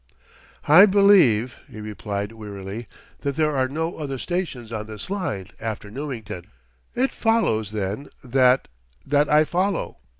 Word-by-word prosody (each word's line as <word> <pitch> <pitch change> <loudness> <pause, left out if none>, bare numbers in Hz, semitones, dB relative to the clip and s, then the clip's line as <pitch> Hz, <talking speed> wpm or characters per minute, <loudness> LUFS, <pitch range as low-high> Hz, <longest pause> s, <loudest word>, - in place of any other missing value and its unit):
"I 175 +8 +9
believe," 185 - +5
he 110 - -10
replied 105 -1 -4
wearily, 105 0 -7 0.3
"that 140 -1 -2
there 150 -1 +1
are 130 -1 +2
no 160 +5 -3
other 140 -3 -4
stations 140 -8 -4
on 110 -1 -4
this 110 - -8
line, 105 - -3
after 110 -2 -5
Newington." 115 - -6 0.5
"It 260 +2 +1
follows, 220 - +1
then, 105 +5 -3 0.2
that 130 0 +3 0.4
that 145 +1 +2
I 150 +1 +6
follow." 185 +4 -1
130 Hz, 135 wpm, -23 LUFS, 110-160 Hz, 0.5 s, I